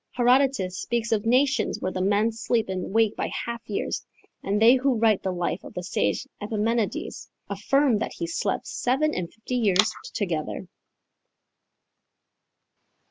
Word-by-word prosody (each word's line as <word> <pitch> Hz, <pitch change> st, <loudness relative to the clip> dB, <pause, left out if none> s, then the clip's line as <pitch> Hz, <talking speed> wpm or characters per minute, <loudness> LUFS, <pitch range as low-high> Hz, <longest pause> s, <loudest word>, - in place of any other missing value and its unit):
Herodotus 245 Hz, -6 st, +2 dB
speaks 235 Hz, -1 st, -2 dB
of 220 Hz, 0 st, +1 dB
nations 255 Hz, -1 st, +2 dB
where 185 Hz, -, -2 dB
the 185 Hz, -, -3 dB
men 205 Hz, +4 st, +2 dB
sleep 225 Hz, -1 st, -1 dB
and 185 Hz, -1 st, -3 dB
wake 220 Hz, 0 st, +3 dB
by -, -, -2 dB, 0.2 s
half 235 Hz, 0 st, -4 dB
years, 205 Hz, -, -2 dB, 0.4 s
and 200 Hz, +1 st, 0 dB
they 225 Hz, +3 st, +7 dB
who 260 Hz, 0 st, +1 dB
write 220 Hz, -3 st, +3 dB
the 190 Hz, -, -1 dB
life 175 Hz, 0 st, -2 dB
of -, -, -11 dB
the 180 Hz, -, -4 dB
sage 190 Hz, -, -1 dB
Epimenides 215 Hz, +1 st, -2 dB, 0.2 s
affirm 275 Hz, -6 st, +2 dB
that -, -, -3 dB
he -, -, -3 dB
slept 170 Hz, +4 st, -2 dB
seven 290 Hz, +5 st, 0 dB
and 170 Hz, -2 st, -3 dB
fifty 230 Hz, +3 st, -4 dB
years 210 Hz, -2 st, +3 dB, 0.2 s
together. 175 Hz, -3 st, -2 dB
220 Hz, 145 wpm, -25 LUFS, 190-240 Hz, 0.4 s, they